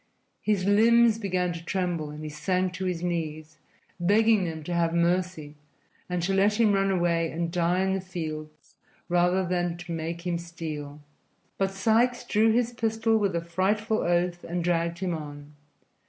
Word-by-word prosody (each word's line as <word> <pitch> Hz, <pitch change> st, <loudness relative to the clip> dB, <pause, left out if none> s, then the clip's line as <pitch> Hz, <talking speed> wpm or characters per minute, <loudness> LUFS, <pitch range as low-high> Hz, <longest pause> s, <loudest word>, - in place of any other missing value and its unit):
His 205 Hz, -3 st, 0 dB
limbs 225 Hz, +2 st, +5 dB
began 180 Hz, -4 st, -1 dB
to 165 Hz, 0 st, -8 dB
tremble 175 Hz, -4 st, -2 dB
and 150 Hz, +1 st, -8 dB
he 155 Hz, -, -5 dB
sank 180 Hz, +4 st, -1 dB
to 185 Hz, +1 st, -4 dB
his 180 Hz, -2 st, -2 dB
knees, 155 Hz, -3 st, -4 dB, 0.4 s
begging 210 Hz, +2 st, +3 dB
them 160 Hz, -2 st, -5 dB
to 175 Hz, -, -4 dB
have 170 Hz, -1 st, +1 dB
mercy 170 Hz, -3 st, 0 dB, 0.6 s
and 180 Hz, -1 st, -1 dB
to 195 Hz, +3 st, 0 dB
let 205 Hz, +3 st, +2 dB
him 215 Hz, -3 st, +4 dB
run 195 Hz, 0 st, +2 dB
away 170 Hz, -3 st, +1 dB
and 170 Hz, +1 st, -3 dB
die 175 Hz, +1 st, +1 dB
in 190 Hz, 0 st, +1 dB
the 190 Hz, -, -1 dB
fields 155 Hz, -4 st, -7 dB, 0.3 s
rather 180 Hz, +2 st, +2 dB
than 175 Hz, -1 st, -1 dB
to 175 Hz, 0 st, -8 dB
make 165 Hz, +1 st, -4 dB
him 175 Hz, -1 st, -1 dB
steal. 155 Hz, -4 st, -7 dB, 0.6 s
But 195 Hz, 0 st, +2 dB
Sikes 225 Hz, +5 st, +2 dB
drew 220 Hz, +2 st, +3 dB
his 240 Hz, +1 st, +1 dB
pistol 225 Hz, -1 st, +1 dB
with 200 Hz, -4 st, 0 dB
a 170 Hz, -, 0 dB
frightful 210 Hz, +6 st, 0 dB
oath 175 Hz, 0 st, 0 dB
and 175 Hz, 0 st, -3 dB
dragged 170 Hz, 0 st, 0 dB
him 180 Hz, -1 st, -2 dB
on. 145 Hz, -2 st, -8 dB
175 Hz, 170 wpm, -27 LUFS, 165-195 Hz, 0.6 s, limbs